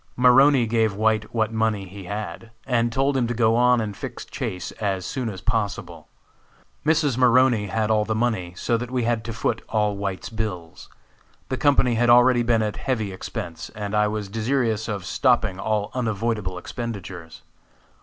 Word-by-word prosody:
Maroney 125 +1 +5
gave 110 -2 +1
White 110 0 +1
what 110 -1 0
money 110 -3 0
he 95 +1 -10
had, 105 +3 -6 0.2
and 120 -2 +1
told 135 +3 +1
him 125 -3 +1
to 120 - -2
go 115 -1 +3
on 125 0 +4
and 105 -3 -3
fix - - -7
Chase 90 - -5
as 95 -3 -1
soon 125 0 -3
as 95 -3 -7
possible. 110 -1 -3 0.8
Mrs. 150 -5 +2
Maroney 125 -3 +4
had 110 +2 0
all 105 -1 +3
the 110 +1 -2
money, 110 -7 -1
so 120 +4 0
that 120 +1 -5
we 125 -1 -1
had 115 -1 0
to 115 - -4
foot 115 0 -1
all 105 -2 +1
White's 100 -2 -4
bills. 105 -8 -5 0.6
The 130 - -1
company 135 -4 +3
had 120 +1 +2
already 125 +1 +6
been 115 -2 +2
at 105 -1 -3
heavy 110 -7 -2
expense, 85 -3 -6
and 105 -1 -5
I 105 0 +3
was 105 -1 -3
desirous 110 +1 -1
of 100 -5 -4
stopping 110 -4 +1
all 105 0 -1
unavoidable 110 -5 -2
expenditures. 95 -6 -7
110 Hz, 175 wpm, -23 LUFS, 105-120 Hz, 0.8 s, already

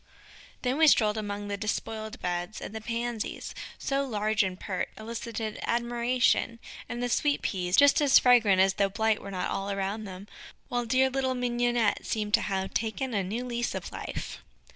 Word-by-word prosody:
Then 255 +4 0
we 320 - +7
strolled 215 -7 +5
among 205 -1 -4
the 200 0 -3
despoiled 220 +1 -3
beds, 175 +3 -3
and - - -7
the 220 - -5
Pansies, 235 0 -3 0.2
so 275 0 0
large 215 -3 +1
and 190 -2 -2
pert, 185 -3 -3
elicited 225 0 -5
admiration, 240 0 +1 0.3
and 240 0 -3
the - - +1
Sweet 285 +4 +1
Peas, 180 -2 0
just 285 +1 +6
as 280 -2 +7
fragrant 225 -6 +5
as 190 0 +4
though 200 0 +1
blight 220 +1 +1
were - - -7
not 185 -2 -2
all 195 +1 -2
around 200 +2 -2
them, 190 +1 -9 0.4
while 245 -1 -1
dear 260 +3 +3
little 260 -1 0
Mignonnette 240 -2 +1
seemed 210 -2 -2
to - - +5
have 190 -1 -2
taken 230 +3 -2
a 200 -2 +1
new 225 +7 -3
lease 240 -1 -2
of - - -5
life. - - -6
220 Hz, 180 wpm, -28 LUFS, 200-245 Hz, 0.4 s, we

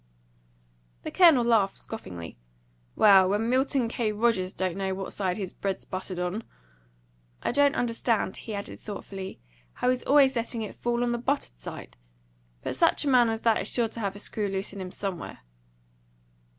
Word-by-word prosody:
The - - -5
Colonel 330 -9 +6
laughed 220 -5 +3
scoffingly. 90 - -8 0.6
"Well, 195 -3 +7
when 220 +4 +1
Milton 260 -1 +2
K. 225 -1 -1
Rogers 210 -4 +1
don't 185 -3 -2
know 190 -1 -1
which 195 0 -5
side 185 -3 -1
his 195 -4 -5
bread's 195 -1 -3
buttered 185 -1 -5
on! 180 +5 -2 1.0
I - - +1
don't 285 +2 +3
understand," 230 -4 0
he 220 - -6
added 200 - -6
thoughtfully, 195 -2 -7 0.3
"how 250 - +1
he's 255 -1 -1
always 275 -2 +5
letting 230 -1 -2
it 210 - -7
fall 240 0 -1
on 240 - 0
the 240 - -1
buttered 245 - -2
side. - - -8 0.7
But - - -3
such 335 -2 +3
a - - +2
man 245 -3 +5
as 225 0 -2
that 225 -2 +3
is - - -1
sure 235 -2 +1
to 230 - -8
have 200 -3 -2
a - - -8
screw 205 0 -3
loose 195 0 -3
in 200 - -7
him 185 - -5
somewhere." 190 -4 -5
215 Hz, 175 wpm, -27 LUFS, 190-240 Hz, 1.0 s, Well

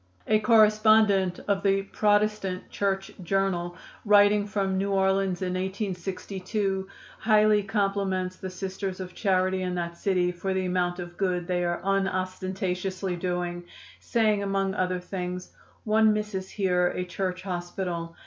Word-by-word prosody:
A 215 0 +3
correspondent 215 -3 +4
of 200 -1 +1
the 195 0 +2
(Protestant) 205 -2 0
Church 195 -1 -1
Journal, 175 -1 0 0.3
writing 205 0 +5
from 195 -2 -1
New 195 +1 0
Orleans 190 -1 +1
in 180 0 -1
1862, 190 +1 -3 0.3
highly 215 -1 +4
compliments 195 -2 -1
the 190 - -6
Sisters 190 0 -5
of 185 -1 -6
Charity 185 -2 +1
in 180 -1 -2
that 170 -1 -3
city 180 -1 +1
for 190 +2 -3
the 190 0 0
amount 180 -1 0
of 175 -1 -8
good 180 -3 0
they 175 0 0
are 175 0 -1
unostentatiously 185 -1 -1
doing, 175 0 -3 0.4
saying 215 -3 +1
among 195 -1 0
other 185 -2 0
things: 180 0 -5 0.3
"One 220 0 +4
misses 210 -3 -3
here 180 -3 +1
a 180 +1 -2
church 185 0 -3
hospital. 175 -2 -4
190 Hz, 135 wpm, -27 LUFS, 180-200 Hz, 0.4 s, writing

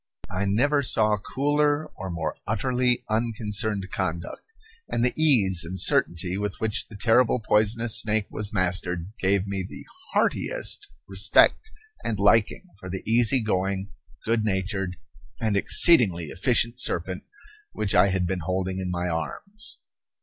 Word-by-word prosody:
I 95 +2 -2
never 140 +9 +2
saw 110 -5 +1
cooler 145 +6 0
or 95 0 -7
more 85 -2 -3
utterly 125 +3 0
unconcerned 110 -3 -2
conduct; 95 - -5 0.4
and 120 - 0
the 125 - +1
ease 105 - +4
and 90 +3 -7
certainty 90 +2 0
with 105 -2 -3
which 110 0 -1
the 110 - -13
terrible 115 +4 +3
poisonous 110 +1 +2
snake 110 -1 0
was 105 -1 -2
mastered 90 -2 -1
gave 95 0 +1
me 100 -1 -3
the 90 - -10 0.3
heartiest - - 0 0.2
respect 440 - +3 0.3
and 110 - -2
liking 105 - +3 0.2
for 95 - -9
the 95 +1 -5
easy 120 +3 +4
going, 95 -1 -2 0.3
good 115 -1 +1
natured, 95 -2 -2 0.4
and 110 -3 0
exceedingly 100 - +5
efficient 120 +4 +2
serpent 90 -5 -2 0.5
which 105 -2 -2
I - - +5
had 95 -2 0
been 95 +1 -2
holding 95 +2 -3
in 95 -1 -4
my 90 0 -2
arms. 195 - -3
105 Hz, 140 wpm, -25 LUFS, 95-115 Hz, 0.5 s, exceedingly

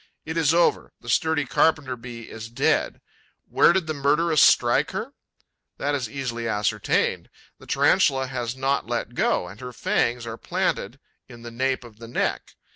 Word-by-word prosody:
It 160 - -5
is 160 -3 +3
over: 170 +1 +2
the - - -11
sturdy 160 -3 +1
Carpenter 140 -1 +1
bee 120 -1 -9
is 115 0 -8
dead. 120 - 0 0.5
Where - - +5
did 185 -1 0
the 155 - -2
murderess 150 +2 +2
strike - - +4
her? - - -4 0.6
That 145 +1 -1
is 130 -6 -2
easily 120 -3 -4
ascertained: 105 -1 0 0.3
the - - -16
Tarantula 135 -1 +3
has 125 -2 -4
not 135 +1 -1
let - - -3
go; 90 - 0
and 95 +5 -11
her 125 0 -6
fangs 120 0 0
are 115 0 -6
planted - - -2 0.3
in 120 -1 -12
the 120 - -8
nape 130 +2 -1
of 115 -3 -15
the 115 - -9
neck. 120 - -2
130 Hz, 170 wpm, -24 LUFS, 115-145 Hz, 0.6 s, Where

